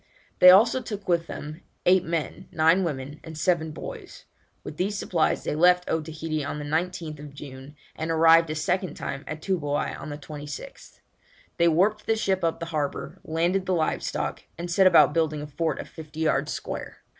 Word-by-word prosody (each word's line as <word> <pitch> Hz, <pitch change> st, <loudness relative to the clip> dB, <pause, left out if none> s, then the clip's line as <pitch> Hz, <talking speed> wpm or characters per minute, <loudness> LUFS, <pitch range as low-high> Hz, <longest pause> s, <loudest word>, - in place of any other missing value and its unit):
They 180 Hz, -, +10 dB
also 225 Hz, +7 st, +6 dB
took 210 Hz, -5 st, -7 dB
with 170 Hz, -2 st, +1 dB
them 155 Hz, +3 st, -7 dB, 0.2 s
eight 185 Hz, 0 st, +5 dB
men, 165 Hz, -3 st, -4 dB
nine 165 Hz, +4 st, +4 dB
women, 145 Hz, -2 st, -4 dB
and 160 Hz, -1 st, -9 dB
seven 170 Hz, -2 st, +1 dB
boys. 155 Hz, -, -9 dB, 0.4 s
With 150 Hz, -, -8 dB
these 200 Hz, +3 st, -1 dB
supplies 170 Hz, -4 st, 0 dB
they -, -, -2 dB
left 180 Hz, +3 st, +4 dB
Otaheite 160 Hz, -1 st, -2 dB
on 140 Hz, +1 st, -4 dB
the 150 Hz, -, -5 dB
19th 155 Hz, -2 st, -3 dB
June, 140 Hz, 0 st, -10 dB, 0.2 s
and 160 Hz, +1 st, -4 dB
arrived 165 Hz, 0 st, +5 dB
a 155 Hz, -, -2 dB
second 180 Hz, +2 st, -1 dB
time 140 Hz, +1 st, -5 dB
at 155 Hz, +1 st, -6 dB
Toobouai 150 Hz, -7 st, -1 dB
on -, -, -8 dB
the 145 Hz, -, -5 dB
26th. 150 Hz, 0 st, -9 dB, 0.6 s
They 170 Hz, -, +4 dB
warped 195 Hz, +6 st, +2 dB
the 225 Hz, -, +3 dB
ship 195 Hz, -4 st, 0 dB
up 165 Hz, -1 st, 0 dB
the 165 Hz, -, -4 dB
harbour, 145 Hz, -2 st, -3 dB
landed 175 Hz, +4 st, 0 dB
the 185 Hz, -, +2 dB
live 160 Hz, -2 st, 0 dB
stock, -, -, -3 dB, 0.2 s
and 170 Hz, +1 st, -5 dB
set 190 Hz, +2 st, +5 dB
about 150 Hz, -5 st, +6 dB
building 155 Hz, -2 st, 0 dB
a -, -, -5 dB
fort 150 Hz, +1 st, -2 dB
of -, -, -6 dB
fifty 155 Hz, 0 st, -9 dB
yards 160 Hz, -, +1 dB
square. -, -, -6 dB
160 Hz, 185 wpm, -26 LUFS, 150-180 Hz, 0.6 s, They